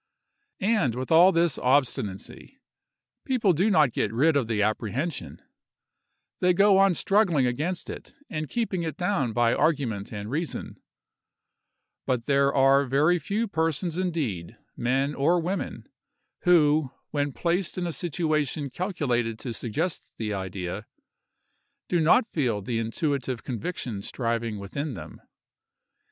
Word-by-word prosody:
And, 195 - +1
with 130 +4 -4
all 175 +4 +7
this 170 -5 +1
obstinacy, 125 - -1 0.7
people 240 - +2
do 185 +7 +2
not 155 - +4
get 105 - 0
rid 145 +7 +3
of 135 -5 +1
the 110 -2 +1
apprehension; 115 - -2 1.0
they 180 -1 +3
go 200 0 +5
on 195 -2 +4
struggling 185 -10 +2
against 150 +9 -2
it - - -9
and 155 -2 -4
keeping 220 -7 -1
it 160 -2 -4
down 180 - 0
by 115 +1 +2
argument 135 -10 0
and 105 0 -6
reason; 160 +3 -4 1.3
but 125 -2 0
there 140 -1 +3
are 135 +1 +4
very 150 +7 +3
few 215 +6 -1
persons 165 -1 -1
indeed, 155 - -2 0.2
men 135 +4 0
or 165 +6 +2
women, 180 +4 -4 0.6
who, 155 -5 +4 0.2
when 145 -1 0
placed 175 +6 -1
in 180 - -1
a 170 - -2
situation 155 -4 -1
calculated 125 - -1
to 120 +1 -5
suggest 145 - -3
the 105 -2 -3
idea, 95 +1 -5 1.0
do 175 - +2
not 165 +9 +5
feel 120 - 0
the 115 +2 -2
intuitive 130 +2 -2
conviction 120 - -4
striving 115 -1 -2
within 130 +8 -4
them. 80 -4 -10
145 Hz, 130 wpm, -26 LUFS, 120-175 Hz, 1.3 s, all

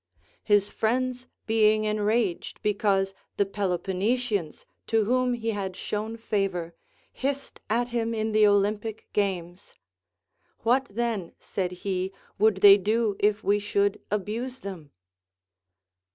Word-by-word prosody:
His 205 -2 +3
friends 250 +4 -1 0.2
being 215 -1 +3
enraged 215 -2 0
because 200 -2 +1 0.2
the 200 - +3
Peloponnesians, 195 +1 -1 0.2
to 225 -1 +2
Avhom 250 +1 +1
he 230 -1 -1
had 195 -3 -4
shown 215 +3 -4
favor, 195 -6 -2 0.4
hissed 275 +1 -3
at 240 +3 +1
him 230 -1 -1
in 220 0 -1
the 215 0 +5
Olympic 205 +2 0
games. 185 -2 -2 0.9
What 255 +4 +3
then, 220 -5 -3
said 185 -2 -3
he, 190 -1 -1 0.3
would 205 -2 +3
they 200 -1 +10
do 215 +1 +1
if 210 +1 +2
we 205 +1 +3
should 200 -1 0
abuse 225 +6 -3
them 180 -7 -7
210 Hz, 120 wpm, -27 LUFS, 195-225 Hz, 0.9 s, they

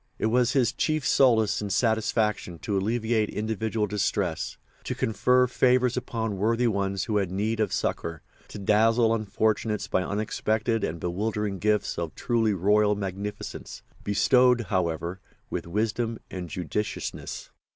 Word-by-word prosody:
It - - -1
was 125 +1 +3
his 130 -5 +2
chief 155 -2 0
solace 115 -7 +3
and 100 -1 -3
satisfaction 110 -5 0
to 105 - -1
alleviate 110 +2 0
individual 110 0 -1
distress, 100 -4 -1 0.3
to - - -2
confer 125 +3 +3
favours 125 0 +2
upon 115 -4 -3
worthy 115 +4 +2
ones 100 -3 0
who 105 -2 0
had 100 -3 0
need 110 +4 -1
of 105 -3 +1
succour, 80 -2 -2 0.2
to - - -9
dazzle 110 +3 +3
unfortunates 110 -1 0
by 95 - +1
unexpected 110 +2 -1
and 85 +1 -2
bewildering 100 +2 -2
gifts 105 -2 0
of 85 -2 -4
truly 115 -4 +1
royal 105 +3 +3
magnificence, 100 +1 -6 0.2
bestowed, 125 +4 +4
however, 85 -1 -1 0.3
with - - -3
wisdom 110 +4 -1
and 90 -2 -5
judiciousness. 90 +6 -4
105 Hz, 135 wpm, -26 LUFS, 100-115 Hz, 0.3 s, bestowed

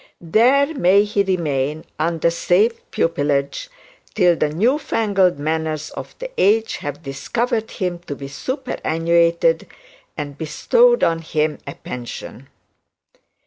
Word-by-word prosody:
There 255 - +3
may 200 - +4
he 210 -1 0
remain, 155 -6 -1
under 165 +1 +1
safe 185 +7 +2 0.2
pupilage, 145 - -1 0.5
till 180 -4 +4
the 155 - 0
new 225 - +1
fangled 195 - +1
manners 155 0 -2
of - - -8
the - - -7
age 220 +3 +3
have 145 +1 -6
discovered 225 - -2
him 180 -3 -3
to 145 - -4
be 140 0 -8
superannuated, 170 - 0 0.5
and 145 -2 -6
bestowed 480 - +3
on 165 0 +2
him 155 -1 -1
a 140 - -6
pension. 125 +2 -8
170 Hz, 120 wpm, -20 LUFS, 150-215 Hz, 0.5 s, may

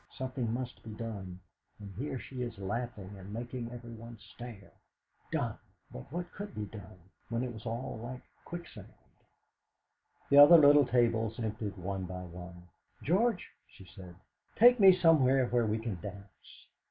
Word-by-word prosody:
Something 130 -3 -3
must 125 +1 -5
be 115 - -11
done; 100 -5 -6 0.4
and 100 -2 -9
here 130 +6 -4
she 130 0 -7
is 120 -3 -4
laughing 100 -1 -5
and 95 +2 -10
making 120 +1 -5
everyone 115 -1 -10
stare!' 110 -1 -11 0.6
Done! - - -2 0.3
But 65 - -10
what 175 +2 -5
could 205 0 -8
be 105 - -3
done, 100 -3 -11 0.3
when 115 +1 -1
it 125 -2 -4
was 110 +1 -9
all 115 +1 -4
like 125 +1 -7 0.2
quicksand? 175 0 -9 1.4
The 140 - +8
other 150 +4 +11
little 145 -2 +7
tables 115 -2 +1
emptied 110 -2 -4
one 95 +1 -4
by 90 0 -6
one. 90 0 -11 0.3
"George," 200 - +1 0.2
she 95 - -16
said, 90 -1 -12 0.4
"take 245 +2 +7
me 195 -2 +9
somewhere 150 -8 +4
where 120 -1 +1
we 110 +1 0
can 110 -6 -5
dance!" 100 -1 -11
115 Hz, 155 wpm, -31 LUFS, 100-130 Hz, 1.4 s, other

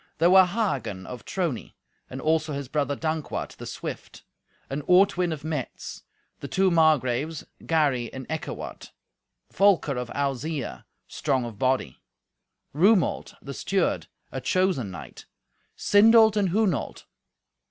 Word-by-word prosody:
There 170 +3 +4
were 190 0 +8
Hagen 175 - -2
of 125 -2 -9
Trony, 170 - -3 0.3
and 130 - -6
also 155 +1 +1
his 140 -1 -4
brother 140 0 -1
Dankwart 155 0 -3
the - - -8
swift; - - -7 0.4
and 140 +2 -3
Ortwin 180 -1 +4
of 150 -2 -5
Metz; 155 -5 -5 0.4
the - - -6
two 190 -1 +2
Margraves, 155 -2 +2 0.2
Gary 140 -7 +1
and 130 -1 -7
Eckewart; 160 -1 -6 0.6
Volker 190 -9 +3
of 125 -1 -4
Alzeia, 140 - -3 0.2
strong 130 -2 -1
of 110 -3 -8
body; 130 - 0 0.7
Rumolt, 185 +4 +2
the 140 - -6
steward, 190 +5 -1 0.2
a 130 - -4
chosen 180 - +1
knight; 90 - -10 0.5
Sindolt 220 +1 +6
and 200 -3 +2
Hunolt. 190 - 0
155 Hz, 125 wpm, -26 LUFS, 130-185 Hz, 0.7 s, were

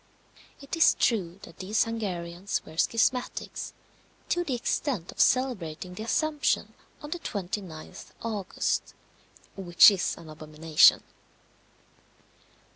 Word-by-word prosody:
It 275 +3 -6
is 330 - +5
true 190 -6 0
that - - -13
these 205 +3 +1
Hungarians 190 -5 -4
were 155 - -12
schismatics, 240 +7 0 0.6
to 350 - +1
the 280 -7 -2
extent 240 - -2
of - - -16
celebrating 190 -9 +1
the 180 - -8
Assumption 300 +6 0 0.3
on 295 - -8
the 350 - -3
29th 185 - -6 0.2
August, 215 -5 -2 0.6
which 180 +1 +7
is 190 -3 -1
an 165 - -12
abomination. 155 0 +3
200 Hz, 110 wpm, -27 LUFS, 170-250 Hz, 0.6 s, which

